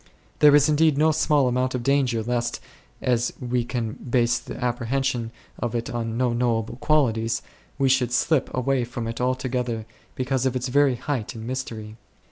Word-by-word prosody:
There 145 -1 +7
is 145 0 +5
indeed 155 -1 +3
no 155 +2 +4
small 150 -3 +2
amount 125 +1 0
of 125 - -3
danger 130 -4 +2
lest, 120 +1 -1 0.4
as 120 -1 +1
we 125 -1 -1
can 115 -2 -3
base 120 -2 +1
the - - -8
apprehension 120 0 -1 0.3
of 120 -1 -2
it 115 0 -2
on 115 -1 -3
no 125 -1 +1
knowable 120 -1 0
qualities, 115 -6 +1 0.3
we 135 - +2
should 130 -2 +2
slip 135 +3 +1
away 130 0 0
from 120 -1 -5
it 115 +1 -4
altogether 125 -3 -1 0.3
because 130 0 0
of 130 - -2
its 125 +1 -2
very 140 0 +3
height 125 -3 -3
and 110 0 -7
mystery. 115 -4 -5
125 Hz, 170 wpm, -24 LUFS, 120-135 Hz, 0.4 s, There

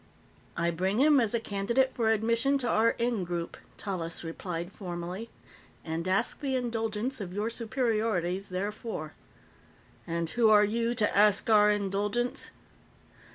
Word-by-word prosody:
"I 170 0 +1
bring 190 +5 -1
him 290 0 +6
as 230 -1 +1
a - - +1
candidate 230 +6 0
for 225 -2 +1
admission 230 +5 +2
to 255 -3 -2
our 230 0 +3
Ingroup," 180 -8 -2 0.2
Tallis 175 -5 -4
replied 170 +1 -5
formally, 180 +3 -6 0.6
"and 165 +2 -3
ask 185 +1 +1
the 270 -2 -1
indulgence 230 0 -2
of 180 -2 -6
Your 215 +3 -1
Superiorities 220 -6 -1
therefor." 190 -3 -4 0.9
"And 170 0 -1
who 235 -2 +3
are 210 -1 +6
you 230 +3 -1
who 210 - +4
ask 210 +1 +3
our 210 -1 +6
indulgence?" 205 +4 -1
210 Hz, 135 wpm, -29 LUFS, 185-230 Hz, 0.9 s, him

